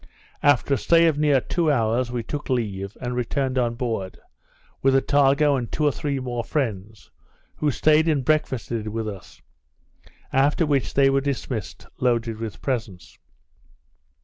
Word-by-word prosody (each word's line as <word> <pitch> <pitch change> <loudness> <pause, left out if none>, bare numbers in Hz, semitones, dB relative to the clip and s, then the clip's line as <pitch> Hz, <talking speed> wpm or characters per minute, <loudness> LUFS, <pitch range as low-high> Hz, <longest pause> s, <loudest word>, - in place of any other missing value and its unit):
After 145 -2 +3
a - - +2
stay 170 0 +4
of 155 -3 +2
near 145 -3 +4
two 160 +4 0
hours, 120 -1 +1
we 120 -2 -3
took 145 +6 -6
leave, 105 -6 -2
and 125 0 -3
returned 130 +2 -1
on 120 -1 0
board, 115 -6 -3 0.6
with 135 0 +3
Attago 140 +1 +3
and 120 -3 -4
two 155 - 0
or 145 - +4
three 140 -1 -3
more 120 -2 -3
friends, 110 -7 -4 0.5
who 150 - +1
staid 155 +3 +3
and 145 -5 +1
breakfasted 120 -7 -1
with 110 +1 -3
us; 100 -3 -10 0.9
after 145 +5 +3
which 140 -3 0
they 135 0 +5
were 135 0 +2
dismissed, 130 -6 -4
loaded 115 -3 0
with 110 -4 -7
presents. 110 -9 -4
130 Hz, 150 wpm, -23 LUFS, 115-145 Hz, 0.9 s, they